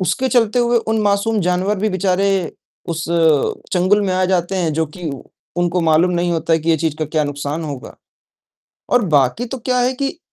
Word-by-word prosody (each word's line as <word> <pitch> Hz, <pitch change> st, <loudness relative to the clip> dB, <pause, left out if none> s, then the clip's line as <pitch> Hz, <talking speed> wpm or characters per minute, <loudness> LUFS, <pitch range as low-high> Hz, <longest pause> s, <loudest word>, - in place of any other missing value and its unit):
उसके 255 Hz, +9 st, 0 dB
चलते 240 Hz, -1 st, +2 dB
हुए 240 Hz, 0 st, +2 dB
उन 220 Hz, 0 st, +1 dB
मासूम 205 Hz, +1 st, +1 dB
जानवर 180 Hz, +3 st, 0 dB
भी 215 Hz, -, +1 dB
बेचारे 190 Hz, +1 st, +1 dB, 0.6 s
उस 165 Hz, -2 st, -3 dB, 0.7 s
चंगुल 185 Hz, +3 st, +3 dB
में 190 Hz, -2 st, 0 dB
आ 185 Hz, -, +1 dB
जाते 185 Hz, 0 st, 0 dB
हैं, 170 Hz, -4 st, 0 dB
जो 160 Hz, +1 st, 0 dB
कि 175 Hz, -4 st, -4 dB, 0.5 s
उनको 175 Hz, 0 st, +1 dB
मालूम 165 Hz, +2 st, +3 dB
नहीं 175 Hz, 0 st, 0 dB
होता 165 Hz, 0 st, -1 dB
है 165 Hz, -, +4 dB
कि 160 Hz, +2 st, -1 dB
ये 165 Hz, -, +4 dB
चीज 160 Hz, -1 st, -1 dB
का 155 Hz, -, 0 dB
क्या 155 Hz, 0 st, -1 dB
नुकसान 145 Hz, +2 st, -4 dB
होगा। 140 Hz, -4 st, -7 dB, 1.0 s
और 245 Hz, -2 st, +4 dB
बाकी 140 Hz, -, +2 dB
तो 265 Hz, +2 st, -6 dB
क्या 250 Hz, +1 st, -1 dB
है 250 Hz, +1 st, +2 dB
कि, 275 Hz, +5 st, -3 dB
180 Hz, 200 wpm, -18 LUFS, 160-210 Hz, 1.0 s, है